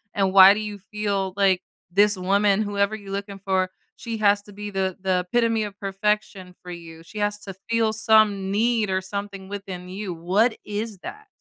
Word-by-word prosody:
and 195 -1 +1
why 195 0 +10
do 205 - -3
you 210 -1 -6
feel 200 -3 -1
like 190 -2 +3 0.3
this 205 +2 +4
woman, 200 +2 +2
whoever 205 +1 0
you're 200 -2 -10
looking 200 0 -5
for, 185 -1 +1 0.3
she 230 -3 -5
has 205 -1 +3
to 205 - -14
be 205 +1 -6
the 190 -1 -2
the 185 -1 +1
epitome 230 -2 +2
of 205 -1 -7
perfection 195 -2 -2
for 180 - -8
you. 165 -1 -10
She 210 +5 -9
has 205 0 0
to 195 - -7 0.2
feel 230 -1 +2
some 215 -3 +3
need 225 0 +1
or 190 0 0
something 195 0 -6
within 190 -3 -7
you. 190 0 -5
What 190 +8 +1
is 210 -1 -4
that? 430 - -9
200 Hz, 190 wpm, -24 LUFS, 190-210 Hz, 0.3 s, why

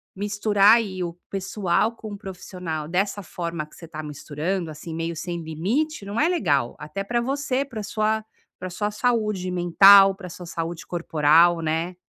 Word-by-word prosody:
misturar 205 +1 +4
aí 195 -5 -3
o 170 -1 -4 0.2
pessoal 195 +2 0
com 220 -2 -9
o 205 - -6
profissional 180 -5 -6
dessa 195 +3 -1
forma 170 -2 -4
que 150 - -23
você 165 - -11
tá 155 -1 -7
misturando, 155 +4 -4
assim, 155 +2 -8
meio 165 +1 -3
sem 170 +1 -4
limite. 200 - -2
Não 205 +3 -3
é 310 - +4
legal. 150 - +1
Até 195 +5 -6
pra 240 +3 0
você, 275 +1 -1
para 250 -6 -8
a - - -7
sua 215 +1 -1 0.3
para 185 - -5
a - - -8
sua 210 +3 -2
saúde 210 -5 0
mental, 195 +3 +7
para 190 -2 -9
a - - -9
sua 175 +1 -9
saúde 170 +2 -5
corporal, 165 0 +3
né. 165 +3 -2
185 Hz, 185 wpm, -24 LUFS, 165-210 Hz, 0.3 s, mental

